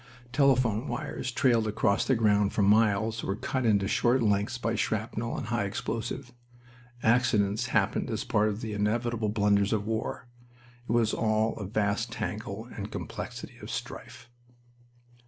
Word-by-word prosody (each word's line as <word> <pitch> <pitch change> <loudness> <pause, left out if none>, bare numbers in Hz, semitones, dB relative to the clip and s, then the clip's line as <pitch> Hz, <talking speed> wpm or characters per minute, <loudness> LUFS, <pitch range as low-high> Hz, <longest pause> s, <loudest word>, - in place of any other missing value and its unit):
Telephone 130 -4 +2
wires 125 +1 -4
trailed 120 -3 +2
across 105 0 +1
the 130 - +3
ground 105 -3 +3
for 105 - +2
miles, 110 +2 +3
were 95 - -1
cut 130 +3 -1
into 100 -3 +3
short 120 +4 +2
lengths 105 +3 +1
by 115 -1 -1
shrapnel 115 +1 -2
and 110 - -5
high 120 -4 0
explosive. 115 +4 -4 0.7
Accidents 110 -1 +2
happened - - +1
as - - -2
part 105 +1 +2
of 105 +2 -4
the 110 -2 -4
inevitable 110 +2 0
blunders 100 -1 +2
of 105 -2 -1
war. 115 +2 -3 0.6
It - - 0
was 115 -2 +2
all 110 0 +1
a 100 - -5
vast 105 +3 0
tangle 110 0 -5
and 105 -1 -6
complexity - - -7
of - - -8
strife. 115 - -7
110 Hz, 150 wpm, -28 LUFS, 105-115 Hz, 0.7 s, the